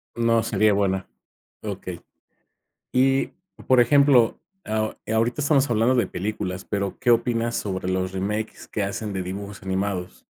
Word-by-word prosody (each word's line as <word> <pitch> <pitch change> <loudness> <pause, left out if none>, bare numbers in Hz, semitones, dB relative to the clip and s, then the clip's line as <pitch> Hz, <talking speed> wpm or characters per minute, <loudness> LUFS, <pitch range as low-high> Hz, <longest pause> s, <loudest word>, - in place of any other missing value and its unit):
No, 115 -1 +2
seria 105 -1 +3
buena, 95 -1 0 0.6
okey. 95 -4 -6 0.9
Y, 135 +1 +3 0.4
por 130 -1 +5
ejemplo, 130 -1 +5 0.3
eh, 110 0 -2
ahorita 115 +4 +1
estamos 140 -2 +3
hablando 115 +2 +3
de 120 - +2
películas, 95 -1 -4
pero, 100 -2 -2
¿qué 125 -2 +3
opinas 115 0 +1
sobre 95 -2 -2
los 95 0 -1
remakes 105 +3 -3
que 105 - -2
hacen 100 +1 -3
de 95 - -2
dibujos 100 +2 -6
animados? 95 -1 -3
110 Hz, 140 wpm, -24 LUFS, 95-120 Hz, 0.9 s, por